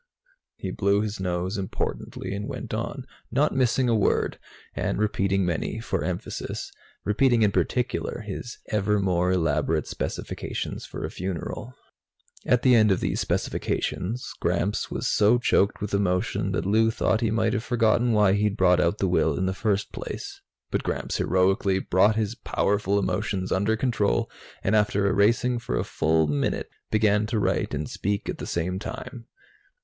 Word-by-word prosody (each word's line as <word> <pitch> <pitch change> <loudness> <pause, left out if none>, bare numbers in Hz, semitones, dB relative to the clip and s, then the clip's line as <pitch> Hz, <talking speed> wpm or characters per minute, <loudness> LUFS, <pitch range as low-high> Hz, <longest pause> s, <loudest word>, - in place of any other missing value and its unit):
He - - -5
blew 100 0 +2
his 105 -1 -3
nose 90 +2 -2
importantly 95 0 -4
and 100 +1 -4
went - - -6
on, - - -3 0.2
not 145 +3 +1
missing 130 0 +2
a 120 - +3
word, 105 -3 +1 0.3
and - - -1
repeating 100 -2 +1
many 90 +5 -2
for 115 - -2
emphasis 90 -1 -4 0.3
repeating 115 +2 +3
in 105 - +4
particular 125 +2 -1
his 110 +3 -6
ever 105 0 +1
more 90 -2 +1
elaborate 80 -3 +1
specifications - - -4
for - - -5
a - - -5
funeral. 95 +7 -5 0.7
At 125 -1 +3
the 130 - +6
end 110 -2 +6
of 95 - +2
these - - -1
specifications, 115 +8 -2
Gramps 105 +3 0
was - - -4
so 110 +3 +4
choked 105 -4 +2
with 105 -1 -4
emotion 90 -2 0
that - - -1
Lou 110 +3 +3
thought 115 0 +1
he 115 - +2
might 110 0 +1
have 110 - -1
forgotten 120 0 +2
why 105 -3 +4
he'd 105 +1 +1
brought 90 -2 +4
out 85 +4 +1
the 95 - +1
will 80 -5 +2
in 95 - 0
the 95 - 0
first 100 0 -1
place. - - -7 0.3
But - - 0
Gramps - - -2
heroically 95 +1 +2
brought 95 +3 +3
his 110 -1 0
powerful 100 -3 0
emotions 95 0 -1
under 100 +4 +2
control 110 - +1 0.3
and, 100 - +2
after 105 -1 +2
erasing 115 +5 +3
for - - -3
a - - 0
full 80 0 +1
minute, 75 -2 -1 0.2
began 105 -1 +2
to 115 0 -1
write 100 - 0
and 75 0 -3
speak 100 +1 -2
at - - -4
the - - -5
same 90 +2 -1
time. 130 +1 -7
100 Hz, 165 wpm, -26 LUFS, 95-110 Hz, 0.7 s, the